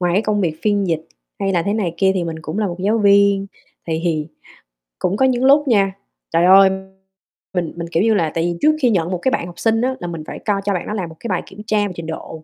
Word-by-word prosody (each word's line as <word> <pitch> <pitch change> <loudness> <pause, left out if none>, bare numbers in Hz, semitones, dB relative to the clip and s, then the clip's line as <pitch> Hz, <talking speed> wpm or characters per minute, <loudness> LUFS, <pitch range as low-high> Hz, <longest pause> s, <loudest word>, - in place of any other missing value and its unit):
ngoài 175 -1 +1
cái 205 - +3
công 210 -2 0
việc 160 -4 -1
phiên 205 -2 +1
dịch 160 -2 -2 0.3
hay 195 -1 0
là 170 -2 +1
thế 200 - -1
này 185 -7 -1
kia 190 +1 +3
thì 180 -2 -1
mình 165 -1 -4
cũng 155 +7 -5
là 210 - +1
một 175 -1 -4
giáo 210 +4 +1
viên, 200 -1 +4 0.4
thì 160 -1 -1
thì 155 -2 -1 0.7
cũng 195 +3 0
có 265 - +3
những 255 0 +1
lúc 285 +1 +5
nha, 195 -5 +3 0.4
trời 165 +2 +3
ơi! 195 +1 +7 0.8
Mình 175 -3 -2
mình, 170 -1 -5
kiểu 170 - +2
như 225 -1 +3
là, 165 -6 +1
tại 165 - +1
vì 175 -1 -2
trước 305 +1 +4
khi 250 - +4
nhận 180 -5 0
một 180 - -1
cái 260 +9 0
bạn - - -1
học 175 -1 -11
sinh 225 0 +2
á 260 +1 0
là 175 - -5
mình 165 -2 -6
phải - - -7
coi 200 -2 -1
cho 200 - +1
bạn 180 - -3
đó - - -3
làm 185 -6 -3
một 160 - -12
cái 235 - -6
bài 185 - -1
kiểm 200 - -11
tra 210 -1 +1
về 190 - -7
trình 170 - -7
độ, 160 0 -7
195 Hz, 285 wpm, -19 LUFS, 170-210 Hz, 0.8 s, ơi